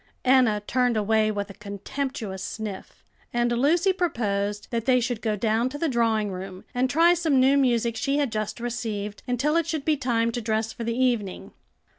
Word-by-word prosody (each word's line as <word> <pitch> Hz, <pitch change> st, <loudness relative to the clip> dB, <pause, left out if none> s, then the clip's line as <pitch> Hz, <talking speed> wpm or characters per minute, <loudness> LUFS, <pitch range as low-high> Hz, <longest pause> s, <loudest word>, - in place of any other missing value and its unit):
Enna 250 Hz, -5 st, +4 dB
turned 245 Hz, -1 st, +1 dB
away 215 Hz, +1 st, +2 dB
with 205 Hz, -1 st, -3 dB
a -, -, -11 dB
contemptuous 205 Hz, +1 st, -5 dB
sniff, 210 Hz, -3 st, -7 dB, 0.3 s
and 240 Hz, 0 st, +1 dB
Lucy 320 Hz, +10 st, +3 dB
proposed 210 Hz, -, -1 dB
that 230 Hz, -2 st, -2 dB
they 255 Hz, -1 st, +4 dB
should 240 Hz, -2 st, -2 dB
go 215 Hz, -2 st, 0 dB
down 225 Hz, +4 st, +1 dB
to 290 Hz, -, -6 dB
the 330 Hz, -, 0 dB
drawing 225 Hz, -5 st, +1 dB
room, 185 Hz, 0 st, -7 dB
and 255 Hz, +1 st, +1 dB
try 330 Hz, +6 st, +5 dB
some 325 Hz, -6 st, +2 dB
new 265 Hz, +2 st, +5 dB
music 235 Hz, -4 st, +2 dB
she 275 Hz, +4 st, 0 dB
had 285 Hz, -5 st, 0 dB
just 215 Hz, +1 st, -3 dB
received, 220 Hz, -4 st, -4 dB
until 265 Hz, +5 st, +1 dB
it 335 Hz, -2 st, +2 dB
should 310 Hz, -4 st, -3 dB
be 310 Hz, -, +3 dB
time 235 Hz, -4 st, 0 dB
to 240 Hz, -, -3 dB
dress 220 Hz, 0 st, -1 dB
for 240 Hz, -, -6 dB
the 230 Hz, +1 st, -2 dB
evening. 240 Hz, -7 st, -1 dB
235 Hz, 190 wpm, -25 LUFS, 215-260 Hz, 0.3 s, try